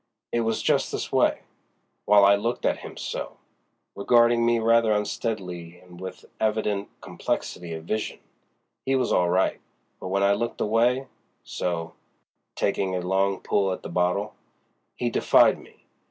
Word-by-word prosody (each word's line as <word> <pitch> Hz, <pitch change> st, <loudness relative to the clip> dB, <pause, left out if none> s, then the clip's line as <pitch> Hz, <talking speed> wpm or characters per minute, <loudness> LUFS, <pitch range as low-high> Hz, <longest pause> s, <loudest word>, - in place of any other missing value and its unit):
It 120 Hz, -, 0 dB
was 115 Hz, -1 st, -1 dB
just -, -, +1 dB
this -, -, -4 dB
way: -, -, +2 dB, 0.6 s
while 105 Hz, -1 st, +6 dB
I 100 Hz, +1 st, +6 dB
looked 115 Hz, +4 st, -2 dB
at -, -, +1 dB
him, -, -, -10 dB
so"—regarding 120 Hz, +3 st, -1 dB
me 120 Hz, 0 st, +3 dB
rather 115 Hz, 0 st, +3 dB
unsteadily 95 Hz, -5 st, -3 dB
and 90 Hz, 0 st, -15 dB
with 95 Hz, -, -8 dB
evident 105 Hz, -2 st, 0 dB
complexity 85 Hz, -2 st, -4 dB
of 80 Hz, -1 st, -7 dB
vision—"he 110 Hz, +6 st, -5 dB
was 130 Hz, -2 st, +1 dB
all 90 Hz, -1 st, +3 dB
right; 95 Hz, +2 st, +1 dB, 0.4 s
but -, -, -6 dB
when 100 Hz, +1 st, 0 dB
I 100 Hz, 0 st, +4 dB
looked 115 Hz, +3 st, -3 dB
away, 120 Hz, +5 st, +2 dB, 0.4 s
so"—taking 90 Hz, +2 st, -4 dB
a 90 Hz, -, -1 dB
long 95 Hz, +1 st, 0 dB
pull 100 Hz, -1 st, +1 dB
at 95 Hz, -, -5 dB
the -, -, -6 dB
bottle—"he 100 Hz, +5 st, -4 dB
defied -, -, +4 dB
me. -, -, -19 dB
100 Hz, 140 wpm, -25 LUFS, 90-115 Hz, 0.6 s, while